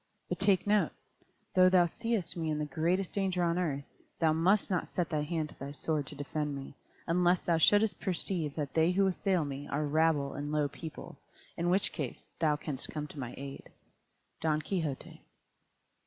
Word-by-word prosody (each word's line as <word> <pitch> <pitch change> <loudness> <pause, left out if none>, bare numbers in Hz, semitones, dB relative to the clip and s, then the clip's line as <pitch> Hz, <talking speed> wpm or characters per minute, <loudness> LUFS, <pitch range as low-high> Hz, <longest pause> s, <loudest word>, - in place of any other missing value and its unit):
But 180 - -2
take 195 -1 +3
note, 205 0 +3 0.6
though 185 0 +7
thou 180 -1 +5
seest 230 +1 -2
me 165 -2 -2
in 155 - 0
the 150 - -1
greatest 170 +6 0
danger 190 -3 +1
on 170 +1 +1
earth, 145 -6 -1 0.3
thou 160 -2 +3
must 190 +6 +3
not 180 - 0
set 175 -2 -2
thy 155 -1 +1
hand 155 0 -2
to - - -15
thy 140 - -5
sword 145 0 -2
to - - -7
defend 145 +1 -3
me, 135 0 -7 0.3
unless 175 +1 +3
thou 170 -2 +2
shouldst 205 +5 +4
perceive 175 -5 -2
that 145 -3 -3
they 165 +2 +3
who 195 +1 +3
assail 185 -3 +1
me 140 0 -5
are 150 +2 -1
rabble 150 -2 +2
and 145 +1 -4
low 150 -1 +2
people, 160 +2 -9 0.4
in 170 +1 0
which 190 +3 +2
case 140 -6 -5
thou 155 -2 +3
canst 145 -3 -1
come 150 -1 -4
to 145 - -9
my 125 -2 -5
aid. 140 0 -8 0.7
_Don 155 -1 +1
Quixote. 160 -8 -3
160 Hz, 185 wpm, -31 LUFS, 150-180 Hz, 0.7 s, though